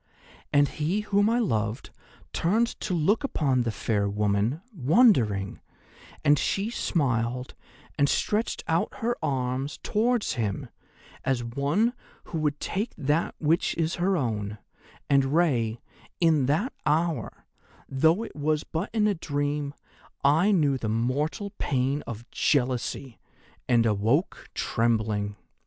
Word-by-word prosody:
And 145 Hz, 0 st, +5 dB
he 165 Hz, +9 st, -1 dB
whom 205 Hz, 0 st, +2 dB
I 235 Hz, -, +2 dB
loved 115 Hz, -, -1 dB, 0.4 s
turned 215 Hz, +8 st, +2 dB
to 185 Hz, -, -2 dB
look 195 Hz, -, +2 dB
upon 140 Hz, -, +1 dB
the 115 Hz, -1 st, -1 dB
fair 105 Hz, -2 st, 0 dB
woman, 105 Hz, +7 st, 0 dB
wondering, 130 Hz, -, +3 dB, 0.7 s
and 145 Hz, 0 st, +5 dB
she 200 Hz, +4 st, 0 dB
smiled 125 Hz, -, -1 dB, 0.5 s
and 140 Hz, 0 st, +4 dB
stretched 215 Hz, +2 st, 0 dB
out 165 Hz, +1 st, +1 dB
her 240 Hz, +1 st, +1 dB
arm 130 Hz, 0 st, -1 dB, 0.2 s
towards 235 Hz, +1 st, +1 dB
him 105 Hz, -5 st, -3 dB, 0.5 s
as 130 Hz, -2 st, 0 dB
one 140 Hz, -, +1 dB, 0.3 s
who 165 Hz, -, -4 dB
would 150 Hz, -1 st, 0 dB
take 210 Hz, +5 st, -3 dB
that 150 Hz, +3 st, 0 dB
which 160 Hz, +2 st, +1 dB
is 165 Hz, 0 st, 0 dB
her 190 Hz, +1 st, +2 dB
own, 105 Hz, -6 st, -2 dB, 0.5 s
and 140 Hz, -1 st, +4 dB
Rei, 120 Hz, -10 st, +2 dB, 0.4 s
in 155 Hz, -6 st, +3 dB
that 170 Hz, -, +1 dB
hour, 160 Hz, +2 st, -1 dB, 0.4 s
though 160 Hz, +10 st, +2 dB
it 230 Hz, -, -9 dB
was 150 Hz, +1 st, 0 dB
but 165 Hz, +5 st, -3 dB
in 215 Hz, -2 st, +2 dB
a 210 Hz, -, +3 dB
dream, 145 Hz, -3 st, -2 dB, 0.5 s
I 160 Hz, +9 st, +4 dB
knew 145 Hz, -8 st, +2 dB
the 110 Hz, -, -2 dB
mortal 140 Hz, -, -1 dB
pain 135 Hz, +2 st, 0 dB
of 120 Hz, +1 st, -7 dB
jealousy, 130 Hz, -2 st, 0 dB, 0.5 s
and 120 Hz, -2 st, +4 dB
awoke 110 Hz, -, 0 dB
trembling. 110 Hz, -3 st, 0 dB
145 Hz, 130 wpm, -27 LUFS, 120-170 Hz, 0.7 s, And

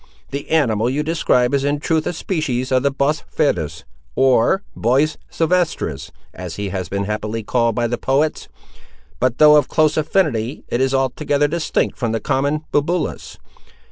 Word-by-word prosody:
The 140 Hz, +1 st, -5 dB
animal 120 Hz, -8 st, +2 dB
you 145 Hz, +4 st, -1 dB
describe 140 Hz, -5 st, +1 dB
is 140 Hz, -1 st, +1 dB
in 145 Hz, +1 st, 0 dB
truth 160 Hz, +1 st, 0 dB
a -, -, -1 dB
species 155 Hz, -8 st, -2 dB
of 130 Hz, -1 st, +3 dB
the 140 Hz, -, +2 dB
bos 140 Hz, +2 st, 0 dB
ferus, 90 Hz, -, -1 dB, 0.3 s
(or 135 Hz, -, +3 dB
bos 135 Hz, +7 st, +1 dB
sylvestris, 165 Hz, -, -1 dB, 0.2 s
as 90 Hz, -2 st, -7 dB
he 100 Hz, -1 st, -4 dB
has 95 Hz, -3 st, -4 dB
been 100 Hz, 0 st, -2 dB
happily 105 Hz, +2 st, -3 dB
called 115 Hz, 0 st, +1 dB
by 120 Hz, -, 0 dB
the 120 Hz, +1 st, -2 dB
poets,) 145 Hz, +4 st, 0 dB, 0.7 s
but, 130 Hz, -1 st, +1 dB
though 150 Hz, 0 st, +7 dB
of 145 Hz, -, +2 dB
close 155 Hz, -1 st, +2 dB
affinity, 150 Hz, -, 0 dB
it 120 Hz, -, 0 dB
is 135 Hz, 0 st, +1 dB
altogether 140 Hz, +2 st, +1 dB
distinct 160 Hz, +1 st, -1 dB
from 115 Hz, -3 st, -1 dB
the 115 Hz, -, 0 dB
common 140 Hz, +3 st, -1 dB
bubulus. 165 Hz, +4 st, -1 dB
135 Hz, 165 wpm, -19 LUFS, 115-155 Hz, 0.7 s, though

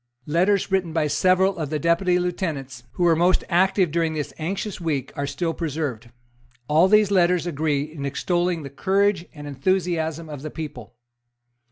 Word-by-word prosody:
Letters 185 Hz, +6 st, +1 dB
written 185 Hz, -4 st, 0 dB
by 160 Hz, -2 st, +1 dB
several 185 Hz, +5 st, +2 dB
of 155 Hz, -3 st, -3 dB
the 155 Hz, -, -1 dB
Deputy 170 Hz, +4 st, +2 dB
Lieutenants 155 Hz, -9 st, -3 dB
who 180 Hz, -, -1 dB
were 170 Hz, -1 st, +5 dB
most 175 Hz, +3 st, +3 dB
active 185 Hz, -1 st, +3 dB
during 165 Hz, -1 st, 0 dB
this 150 Hz, -2 st, -4 dB
anxious 190 Hz, +4 st, -4 dB
week 150 Hz, -6 st, -2 dB
are 140 Hz, 0 st, -2 dB
still 165 Hz, +4 st, -2 dB
preserved. 145 Hz, -8 st, -4 dB, 0.6 s
All 160 Hz, +5 st, +5 dB
these 210 Hz, 0 st, +4 dB
letters 180 Hz, -2 st, +3 dB
agree 150 Hz, -3 st, 0 dB
in 155 Hz, -1 st, -8 dB
extolling 175 Hz, +4 st, -1 dB
the 140 Hz, -, -8 dB
courage 195 Hz, +3 st, +1 dB
and 145 Hz, -1 st, -10 dB
enthusiasm 160 Hz, +2 st, -1 dB
of 145 Hz, -3 st, -8 dB
the 155 Hz, -, -5 dB
people. 125 Hz, -8 st, -8 dB
165 Hz, 165 wpm, -23 LUFS, 150-180 Hz, 0.6 s, were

